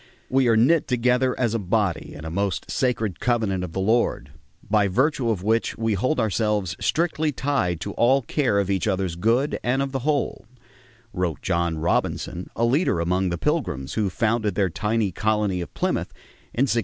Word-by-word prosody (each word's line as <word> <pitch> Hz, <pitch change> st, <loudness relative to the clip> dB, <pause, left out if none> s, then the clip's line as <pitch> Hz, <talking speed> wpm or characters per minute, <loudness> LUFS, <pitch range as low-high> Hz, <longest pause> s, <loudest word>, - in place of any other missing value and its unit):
"We 130 Hz, -1 st, +3 dB
are 115 Hz, -1 st, +4 dB
knit 150 Hz, +8 st, +4 dB
together 125 Hz, 0 st, +1 dB
as 120 Hz, -3 st, +1 dB
a 115 Hz, -, 0 dB
body 95 Hz, -3 st, -1 dB
in 75 Hz, -, -9 dB
a 80 Hz, -, -5 dB
most 100 Hz, +1 st, -2 dB
sacred 115 Hz, -7 st, -1 dB
covenant 110 Hz, -7 st, 0 dB
of 85 Hz, -3 st, -6 dB
the -, -, -2 dB
Lord... 95 Hz, -, +1 dB, 0.4 s
by 105 Hz, -1 st, +3 dB
virtue 130 Hz, -, +1 dB
of 100 Hz, -5 st, -1 dB
which 110 Hz, +2 st, 0 dB
we 115 Hz, -1 st, 0 dB
hold 130 Hz, +9 st, 0 dB
ourselves 105 Hz, -3 st, 0 dB
strictly 160 Hz, -2 st, 0 dB
tied 125 Hz, -, -1 dB
to 100 Hz, -, -4 dB
all 130 Hz, +3 st, +3 dB
care 120 Hz, -6 st, +1 dB
of 100 Hz, -1 st, +1 dB
each 95 Hz, +3 st, 0 dB
other's 95 Hz, -4 st, -1 dB
good 115 Hz, -, +1 dB
and 125 Hz, +3 st, +1 dB
of 135 Hz, 0 st, -1 dB
the 135 Hz, -, -2 dB
whole," 140 Hz, -4 st, -1 dB, 0.7 s
wrote 90 Hz, -4 st, -2 dB
John 85 Hz, -2 st, 0 dB
Robinson, 85 Hz, +2 st, -1 dB
a 115 Hz, -, +1 dB
leader 130 Hz, -, +2 dB
among 90 Hz, +2 st, +1 dB
the 85 Hz, -, -2 dB
Pilgrims 105 Hz, -, -2 dB
who 105 Hz, -3 st, 0 dB
founded 110 Hz, 0 st, 0 dB
their 95 Hz, -4 st, +1 dB
tiny 105 Hz, +1 st, 0 dB
colony 105 Hz, -2 st, 0 dB
of 85 Hz, -, -7 dB
Plymouth -, -, -1 dB, 0.4 s
in 125 Hz, -, +1 dB
1620. 125 Hz, -3 st, +2 dB
110 Hz, 185 wpm, -24 LUFS, 95-125 Hz, 0.7 s, are